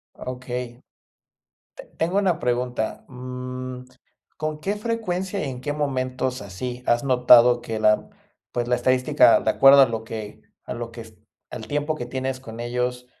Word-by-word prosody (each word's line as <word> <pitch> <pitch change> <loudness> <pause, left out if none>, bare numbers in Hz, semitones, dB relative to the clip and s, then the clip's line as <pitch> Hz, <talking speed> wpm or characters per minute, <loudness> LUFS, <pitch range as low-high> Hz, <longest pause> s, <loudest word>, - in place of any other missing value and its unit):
Ah, - - -10
okey. 125 -1 -6 0.9
Te - - -10
tengo 175 +5 +1
una 185 -5 +2
pregunta. 125 -2 -2
Mm, 125 0 -7 0.5
¿con 155 0 -4
qué 200 +6 -2
frecuencia, 200 -5 -2
y 140 - -3
en 125 -1 -7
qué 145 +3 -3
momentos 130 -4 -2
así 125 +6 -6
has 120 0 +2
notado 125 -2 +6
que 110 -2 -4
la, 105 0 +3 0.4
pues, 120 -1 -2
la 125 - +3
estadística, 130 +1 +4
de 110 - +1
acuerdo 135 +4 +7
a - - +6
lo 115 -2 -4
que 110 -2 -7 0.2
a - - -5
lo 120 0 -6
que 115 0 -9
s 110 -1 -16 0.3
al 110 - -7
tiempo 145 +3 -1
que 120 - -6
tienes 130 +1 -3
con 115 -3 -10
ellos, 125 +1 -2
125 Hz, 170 wpm, -23 LUFS, 120-140 Hz, 0.9 s, acuerdo